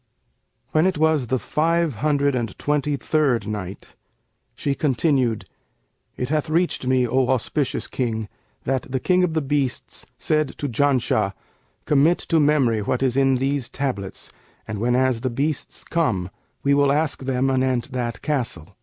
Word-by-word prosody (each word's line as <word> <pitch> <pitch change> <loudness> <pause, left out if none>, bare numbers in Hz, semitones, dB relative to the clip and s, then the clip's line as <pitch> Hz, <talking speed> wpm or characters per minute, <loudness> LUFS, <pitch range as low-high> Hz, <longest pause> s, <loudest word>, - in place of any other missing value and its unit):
When 155 +4 +3
it 185 - 0
was 155 -4 +2
the 130 - +1
Five 165 -1 0
Hundred 145 +2 +2
and 115 -6 -3
Twenty 145 0 0
third 135 -8 +1
Night, 100 -2 -6 0.6
She 140 - -1
continued, 135 -5 +1 0.7
It 125 - -2
hath 155 +1 0
reached 165 -5 0
me, 130 -1 +3
O 130 +2 +2
auspicious 130 +2 0
King, 110 -4 -2 0.4
that 130 0 -2
"the 130 - 0
King 180 +6 +3
of 165 -3 0
the 160 - +1
Beasts 135 -3 -2
said 155 -3 0
to 145 - -2
Janshah, 135 +1 +1 0.5
'Commit 150 +4 +4
to 165 - +1
memory 140 -7 +3
what 125 +5 -1
is 130 -2 +1
in 135 -1 +4
these 135 -1 -1
tablets; 125 -9 -4 0.4
and 110 -2 -4
whenas 125 +1 +2
the 130 - 0
beasts 140 +4 -2
come, 95 - 0 0.3
we 140 - +3
will 140 -1 +4
ask 150 0 0
them 135 0 +1
anent 130 0 0
that 120 -3 -3
castle.' 115 - -2
135 Hz, 155 wpm, -23 LUFS, 125-150 Hz, 0.7 s, Commit